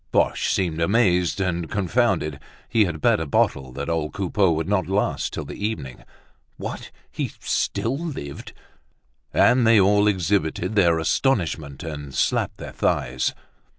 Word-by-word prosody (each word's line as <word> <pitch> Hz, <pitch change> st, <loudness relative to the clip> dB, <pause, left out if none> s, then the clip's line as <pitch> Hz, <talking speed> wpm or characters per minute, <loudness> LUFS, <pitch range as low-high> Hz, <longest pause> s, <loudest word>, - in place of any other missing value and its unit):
Boche -, -, +1 dB
seemed 85 Hz, -4 st, 0 dB
amazed 90 Hz, -2 st, +2 dB
and 85 Hz, -3 st, -1 dB
confounded; 95 Hz, -, 0 dB, 0.3 s
he 110 Hz, -2 st, +3 dB
had 85 Hz, -4 st, -4 dB
bet -, -, +3 dB
a 80 Hz, -, -3 dB
bottle 65 Hz, -1 st, +1 dB
that 70 Hz, +3 st, -5 dB
old 80 Hz, -2 st, -1 dB
Coupeau 95 Hz, -1 st, +1 dB
would 80 Hz, 0 st, -1 dB
not 95 Hz, -4 st, +1 dB
last 100 Hz, +2 st, 0 dB
till -, -, -5 dB
the -, -, -8 dB
evening. 85 Hz, -, -4 dB, 0.5 s
What! -, -, -6 dB, 0.2 s
He -, -, -2 dB
still 130 Hz, +5 st, -1 dB
lived! 135 Hz, -, -6 dB, 0.8 s
And 125 Hz, -2 st, +4 dB
they 115 Hz, -1 st, +6 dB
all 105 Hz, +2 st, +4 dB
exhibited 95 Hz, -2 st, 0 dB
their 85 Hz, -6 st, +4 dB
astonishment, 80 Hz, -, 0 dB
and 75 Hz, -4 st, -7 dB
slapped -, -, 0 dB
their -, -, -8 dB
thighs. 65 Hz, +1 st, 0 dB
90 Hz, 145 wpm, -23 LUFS, 80-105 Hz, 0.8 s, they